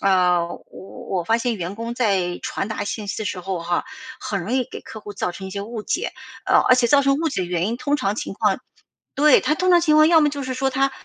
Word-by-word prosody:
啊， 180 -3 +3
我 170 - -8
我 190 - -11 0.2
我 - - -5
发 225 +6 +2
现 235 -2 -1
员 180 +2 -4
工 230 +2 -5
在 195 -7 0
传 195 - -3
达 220 - -3
信 205 0 -5
息 - - -3
的 - - -4
时 205 -3 -3
候 185 -1 -4
哈， 175 +6 -1 0.4
很 200 - -3
容 220 +8 -4
易 260 -1 +2
给 - - -7
客 220 - -10
户 205 -1 -9
造 180 - -2
成 190 +2 -8
一 - - -7
些 200 +1 -4
误 220 +1 -6
解。 - - -2 0.3
呃， - - +4
而 255 - +8
且 250 -1 +3
造 280 +4 +5
成 275 0 +3
误 325 0 0
解 270 - -2
的 180 - -2
原 175 0 -1
因 230 +3 -2
通 285 +4 0
常 200 -6 -1
情 - - -5
况 - - +1 0.6
对， 300 +2 +5
他 305 - +1
通 370 +2 +2
常 345 -1 +6
情 305 -2 +3
况， 310 0 +7
要 325 -1 +6
么 300 - +3
就 285 -1 -5
是 260 0 -3
说 265 +1 0
他 270 +1 +1
225 Hz, 300 characters per minute, -22 LUFS, 190-270 Hz, 0.6 s, 而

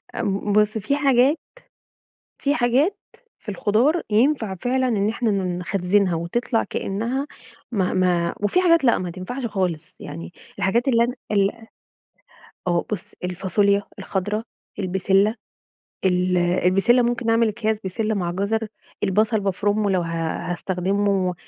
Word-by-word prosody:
آمم 205 -2 -1
بُص، 210 +1 +3
في 270 +7 0
حاجات 275 +1 +4 1.0
في 285 +1 0
حاجات 265 - +2 0.4
في 215 - -9
الخضار 225 - +2
ينفع 220 -3 +2
فعلًا 255 +6 0
إن 210 -3 +1
إحنا 230 0 -1
ن 185 -3 -1
نخزّنها 185 0 +1
وتطلع 225 +8 -1
كإنّها 235 +8 -3 0.4
ما 190 -5 0
ما 175 -2 +1
وفي 285 - +2
حاجات 335 -4 +4
لأ 240 - +4
ما 180 -1 -4
تنفعش 235 +9 -5
خالص. 180 -6 -3
يعني 165 +4 -8 0.3
الحاجات 235 +7 +1
اللي 235 -3 +4
أنا 245 +2 -2 0.2
ال 200 -1 +3
أ 225 -1 -16 1.0
آه. 175 -1 +1
بُص، 205 - -4
الفاصوليا 200 +3 +1 0.2
الخضرا، 205 +3 -2 0.4
البِسِلَّة 195 +2 +2 0.7
ال 180 0 +2
البِسِلَّة 185 +7 +3
ممكن 240 0 -1
نعمل 230 0 +4
أكياس 220 0 -1
بسلة 215 +3 -1
مع 175 -3 -1
جزر، 215 +4 -1 0.4
البصل 215 +3 +2
بافرُمه 205 +1 0
لو 185 -2 +2
ه 170 - -3 0.5
هاستخدمه 190 +1 0
205 Hz, 135 wpm, -22 LUFS, 185-235 Hz, 1.0 s, حاجات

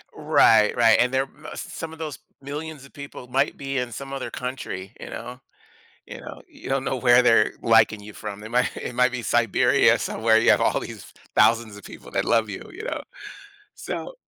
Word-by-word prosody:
Right, 110 -2 +4
right, 115 -2 +5
and 125 +1 +2
there 130 +1 +2 0.2
uh, - - -8
some 160 0 -7
of 160 - -13
those 155 -3 -5 0.2
millions 145 +1 -7
of 140 - -18
people 140 -3 -10
might 135 +3 0
be 135 -1 -4
in 125 -1 -2
some 135 +4 -7
other 135 - -5
country, 110 -6 -6
you - - -8
know, 125 +1 -8 0.7
you - - -9
know, - - -10
you - - -11
don't 135 0 0
know 135 - -1
where 120 0 +5
they're 125 - +4
liking 105 - +4
you 105 +1 -11
from. 105 -1 -7
They 110 - -8
might 125 +2 0
it 125 - -6
might 125 +1 +3
be 125 - -4
Siberia 115 -2 +3
somewhere 110 0 +2
you 115 - +4
have - - +4
all - - +1
these - - -9 0.2
thousands 110 -1 +3
of 100 - -13
people - - -12
that - - 0
love 115 -2 +2
you, 100 - -8
you 435 - -9
know? - - -3 0.7
So, - - -6
125 Hz, 205 wpm, -24 LUFS, 110-135 Hz, 0.7 s, right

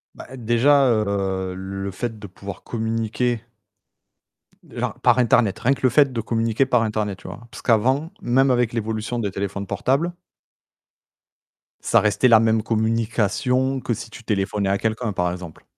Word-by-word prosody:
Bah, - - -10
déjà, 125 +5 +3
heu, 100 -4 0
le 95 +1 -5
fait 110 +4 -4
de 105 - -9
pouvoir 100 +1 -9
communiquer 115 +1 -1 1.3
genre, - - -4
par - - +4
Internet, 115 -3 +3
rien 130 - +3
que - - -8
le 130 - +5
fait 140 +1 +4
de 115 -2 -2
communiquer 115 +2 0
par 125 -3 +2
Internet, 105 -3 -2
tu - - -11
vois? 120 +1 -10
Parce - - -10
qu'avant, 130 +8 +2
même 130 -2 +3
avec 120 -2 +1
l'évolution 110 +1 -3
des 100 -3 -2
téléphones 100 +1 -4
portables 140 - 0 1.7
ça - - +3
restait 105 +4 +3
la 115 -2 +7
même 110 -1 +2
communication 115 +4 0
que 120 - -2
si 110 +1 -7
tu 115 +1 -12
téléphonais 100 -1 -1
à 100 - +2
quelqu'un, 110 0 -2
par 90 -1 0
exemple. 90 -3 -9
115 Hz, 160 wpm, -22 LUFS, 100-125 Hz, 1.7 s, la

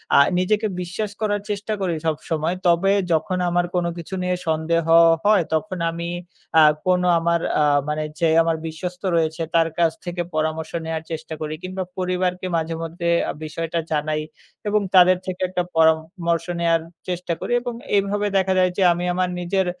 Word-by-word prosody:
আ - - +7 0.2
নিজেকে 210 +4 +1
বিশ্বাস 190 +4 -4
করার 205 -1 0
চেষ্টা 205 +1 -2
করি 180 -3 0
সবসময়। 160 +2 -1
তবে 175 +3 +4 0.2
যখন 185 +3 0
আমার 175 0 +1
কোন 175 -1 +1
কিছু 170 +2 -8
নিয়ে 180 0 0
সন্দেহ 160 +1 +1 0.4
হয় 205 -3 +5
তখন 185 +4 -1
আমি 170 +1 -5 0.5
আ - - +8 0.2
কোন 180 -1 +3 0.2
আমার 170 +1 +1 0.2
আ - - +5 0.3
মানে 155 0 -1 0.2
যে 170 - +3 0.2
আমার 165 -1 0
বিশ্বস্ত 180 +3 -6
রয়েছে 160 0 0
তার 165 -1 +4
কাছ 165 -1 +4
থেকে 175 0 -3
পরামর্শ 155 +1 -1
নেয়ার 160 0 -3
চেষ্টা 160 0 -5
করি 155 0 -3
কিংবা 185 +1 -4
পরিবারকে 180 0 -1
মাঝেমধ্যে 165 +1 -3 0.2
আ - - 0
বিষয়টা 165 +2 -3
জানাই 155 0 0 0.5
এবং 210 0 +2
তাদের 185 0 +7
থেকে 185 -1 -5
একটা 180 -1 -1
পরা-মর্শ 160 +1 +2
নেয়ার 165 -1 +2 0.3
চেষ্টা 180 -1 -2
করি - - -5
এবং 245 0 -4 0.2
এইভাবে 205 +1 +1
দেখা 190 0 +2
যায় 185 0 +3
যে 195 - +3
আমি 175 +1 -3
আমার 180 0 0
নিজের 190 +2 0
175 Hz, 165 wpm, -22 LUFS, 160-185 Hz, 0.5 s, আ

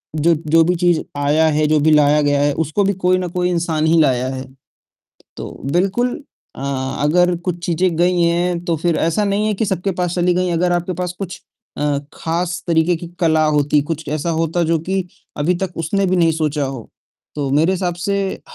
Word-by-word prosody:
जो 165 +2 +3
जो 165 +1 +3
भी 180 +2 +1
चीज़ 175 -1 +2 0.2
आया 150 +3 +2
है, 155 0 +2
जो 155 0 +3
भी 155 +2 +3
लाया 150 0 +4
गया 145 -1 +2
है 145 0 +2
उसको 160 +6 0
भी 200 +1 +1
कोई 185 0 +4
ना 185 - -2
कोई 180 +1 -1
इंसान 165 -3 0
ही 165 +1 +4
लाया 130 -3 +2
है। 130 - -5 0.9
तो - - -6 0.2
बिल्कुल 195 +8 +1 0.4
अ, - - -9 0.4
अगर 175 +3 +3
कुछ 175 -1 -2
चीज़ें 175 0 +1
गई 175 +1 +2
हैं 170 +1 +1
तो 170 - +1
फ़िर 165 +1 0
ऐसा 165 +6 +1
नहीं 200 +1 0
है 215 - +1
कि 215 +3 -1
सबके 190 0 -1
पास 175 -1 -1
चली 180 0 +2
गई। 180 0 0
अगर 175 +1 +1
आपके 175 +1 -1
पास 180 0 -3
कुछ 190 -3 -6 0.4
अ, 145 -1 0
खास 170 +2 -3
तरीके 165 +1 +2
की 170 +1 -7
कला 160 -2 +3
होती, 150 -1 +2
कुछ 160 +1 -5
ऐसा 155 +2 -2
होता 165 +1 0
जो 165 +1 +1
कि 190 +3 -2 0.3
अभी 155 +5 +1
तक 190 -1 -4
उसने 180 +5 0
भी 185 0 +1
नहीं 165 -2 +3
सोचा 150 -2 -1
हो, 130 -3 -5 0.5
तो 140 -2 -2
मेरे 155 +6 +3
हिसाब 180 -2 -1
से 200 +3 -1 0.2
अ, - - -17
170 Hz, 210 wpm, -18 LUFS, 155-180 Hz, 0.9 s, लाया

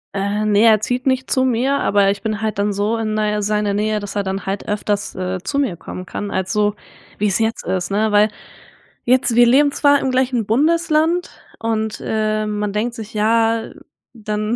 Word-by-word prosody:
Äh, 200 +2 -1
ne, 205 -1 +3
er 220 -2 +6
zieht 250 +4 -2
nicht 260 0 0
zu 260 - +2
mir, 260 +2 +1
aber 200 -1 +3
ich 200 - -5
bin 215 -1 -2
halt 215 -2 -2
dann 205 0 +1
so 205 +3 -1
in 215 -1 -2
dei 210 -1 0
seiner 210 0 0
Nähe, 210 +1 0
dass 205 -1 -7
er 205 - +1
dann 190 0 -4
halt 195 +1 -4
öfters, 205 0 -2
äh, 185 0 -3
zu 235 +9 -3
mir 265 -11 0
kommen 180 +2 -8
kann 205 +2 -5
als 190 -1 -2
so 210 0 +1 0.4
wie 210 - +1
es 195 0 0
jetzt 225 0 -1
ist, 185 -1 -2
ne, 210 +2 +1
weil 210 +1 +4 0.8
jetzt 250 -1 +3
wir 240 0 +6
leben 285 +3 +4
zwar 285 0 +3
im 265 - -1
gleichen 255 -3 0
Bundesland, 320 +6 +1 0.3
und, 220 -1 -2
äh, 215 -1 -1
man 210 -1 -2
denkt 230 +3 -1
sich, 220 +1 -9
ja, 225 +1 +1 0.4
dann 215 0 -3
215 Hz, 200 wpm, -19 LUFS, 205-240 Hz, 0.8 s, er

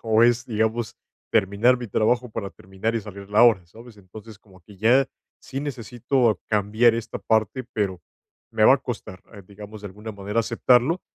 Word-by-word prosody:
o 110 0 +3
es, 120 +1 +2
digamos, 110 0 -1 0.4
terminar 110 +4 +3
mi 120 - -6
trabajo 120 +5 +1
para 105 -3 -5
terminar 95 +5 -5
y 115 - 0
salir 100 -1 -10
la 105 +3 +5
hora, 100 -7 +3
¿sabes? 115 +6 -15
Entonces, 105 +2 -13
como 95 -4 -21
que 100 -2 -15
ya 125 +6 +3 0.3
sí 135 +1 -6
necesito 120 -4 -1
cambiar 110 +3 +3
esta 115 0 -5
parte, 110 +3 0
pero 95 -4 -2 0.5
me - - +2
va - - +8
a - - -2
costar, 95 0 -7
eh, 100 - -11
digamos, 105 +1 -11
de - - -6
alguna 105 +3 -9
manera 100 +3 -2
aceptarlo, 125 +8 +2
110 Hz, 180 wpm, -23 LUFS, 100-120 Hz, 0.5 s, va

